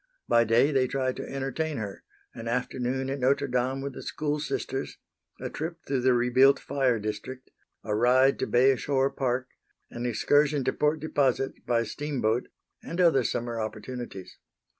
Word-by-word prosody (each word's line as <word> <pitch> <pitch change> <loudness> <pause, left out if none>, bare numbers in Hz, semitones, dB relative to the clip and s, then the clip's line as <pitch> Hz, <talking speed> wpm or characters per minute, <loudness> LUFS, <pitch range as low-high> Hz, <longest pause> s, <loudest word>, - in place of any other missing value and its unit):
By 115 0 +4
day 115 +6 +4
they 130 -2 +2
tried 130 -1 -1
to - - -6
entertain 140 +3 -2
her 100 -3 -6 0.3
an 115 0 -7
afternoon 125 +2 -1
at 140 - -3
Notre 135 +2 +2
Dame 130 +1 -1
with 140 0 -4
the - - -8
school 150 0 -2
Sisters, 135 -2 -3 0.4
a - - -4
trip 165 +2 -4
through 135 -2 0
the 125 0 +4
rebuilt 125 +3 +5
fire 135 -4 0
district, 110 +5 -6 0.3
a 105 - -2
ride 130 +4 +4
to - - -1
Bay 130 +2 +4
Shore 135 +1 +1
Park, 130 -1 -1 0.4
an 120 +1 -3
excursion 145 +5 +2
to - - 0
Port 150 +1 +1
Deposit 135 -4 0
by 115 -1 +2
steamboat 125 -3 -1 0.3
and 170 - -6
other 165 -8 +5
summer 120 -1 -2
opportunities. 110 -2 -7
130 Hz, 160 wpm, -27 LUFS, 120-140 Hz, 0.4 s, rebuilt